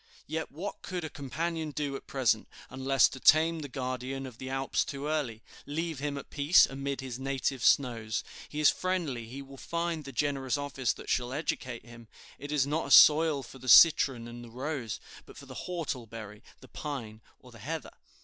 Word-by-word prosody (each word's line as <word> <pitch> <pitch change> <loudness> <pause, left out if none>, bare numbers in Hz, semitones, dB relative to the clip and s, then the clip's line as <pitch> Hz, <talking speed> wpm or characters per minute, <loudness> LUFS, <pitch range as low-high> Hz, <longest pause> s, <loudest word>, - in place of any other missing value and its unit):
Yet 160 +1 -4
what 185 +7 -6
could 180 -3 -4
a 155 - -5
companion 160 +4 -3
do 145 -1 -3
at - - -9
present, 130 -6 +1 0.2
unless 130 -1 +3
to 130 - -9
tame 160 +4 +5
the 150 - -5
guardian 130 0 -4
of 125 -3 -10
the 130 - -6
Alps 135 0 0
too 140 0 -6
early? 145 -8 -2 0.2
Leave 160 0 -3
him 145 0 -2
at 140 - -9
peace 145 +4 +6
amid 140 0 -4
his 130 -2 -6
native 135 -2 -2
snows. 115 -5 +2 0.3
He 150 - -5
is 150 - +6
friendly; 165 -11 -2
he 135 +4 -8
will 135 0 -13
find 170 +1 -2
the 135 - -8
generous 135 -2 0
office 135 -4 -1
that - - -12
shall 125 0 0
educate 130 -5 -3
him. 120 -1 -13 0.3
It 145 +1 -7
is 145 -3 +2
not 150 +3 -1
a - - -6
soil 155 -2 +7
for 130 +2 -12
the 130 - -5
citron 135 -6 +7
and 120 0 -9
the 120 - -11
rose, 130 -3 -4 0.3
but - - -13
for - - -11
the - - -8
whortleberry, 115 - -5 0.2
the 130 - -13
pine, 120 -7 -6 0.2
or 125 - -16
the 115 - -14
heather. 155 +8 -5
135 Hz, 195 wpm, -30 LUFS, 125-150 Hz, 0.3 s, soil